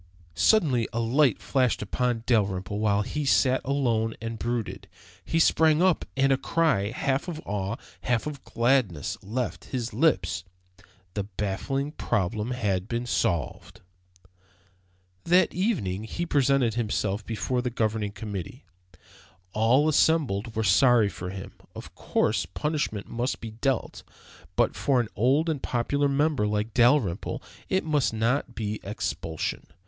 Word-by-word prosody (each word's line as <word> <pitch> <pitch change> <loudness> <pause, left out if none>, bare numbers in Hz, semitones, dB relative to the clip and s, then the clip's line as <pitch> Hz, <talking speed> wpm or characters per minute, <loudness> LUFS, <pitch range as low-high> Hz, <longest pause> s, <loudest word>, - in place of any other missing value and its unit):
Suddenly 125 - +3
a 115 - -2
light 125 +2 +2
flashed 125 -5 +1
upon 120 +2 -1
Dalrymple 100 -3 0
while 105 -1 +2
he 150 +8 -3
sat 130 -1 +3
alone 120 -5 0
and 115 0 -5
brooded. 120 -2 -3 0.4
He 165 - -1
sprang 160 -1 +4
up 185 -4 +2
and 135 0 +3
a 135 - +4
cry, 155 -12 +1
half 135 +5 -1
of 165 -3 -4
awe, 100 +1 -2 0.3
half 120 -3 0
of 145 -3 -6
gladness, 115 - +1
left 115 +4 -4
his 125 -2 -4
lips. 95 - +1 0.7
The 100 -2 -2
baffling 105 +8 -3
problem 105 - -1
had 100 -7 -1
been 120 +1 -2
solved! 85 - -2 1.4
That 180 +2 +4
evening 110 - -1
he 170 +9 -3
presented 140 -6 +2
himself 105 -3 -1
before 120 +4 -2
the 125 - -2
Governing 110 -3 -1
Committee. 105 - -7 0.9
All 120 +7 +3
assembled 135 -9 +2
were 110 - 0
sorry 110 +2 +5
for 90 -2 -6
him. 95 0 -7 0.2
Of - - -9
course, - - 0
punishment 150 -9 -2
must 120 +3 -2
be 115 - -7
dealt, 125 +3 -2 0.5
but - - +2
for 135 -3 +2
an 115 -3 -1
old 135 - +2
and 155 -5 -1
popular 140 +4 0
member 140 -5 +1
like 105 +1 -1
Dalrymple 120 - +2 0.3
it 190 - +1
must 150 -6 +1
not 120 +3 0
be 105 -1 -3
expulsion. 100 -6 -4
120 Hz, 135 wpm, -26 LUFS, 105-140 Hz, 1.4 s, sorry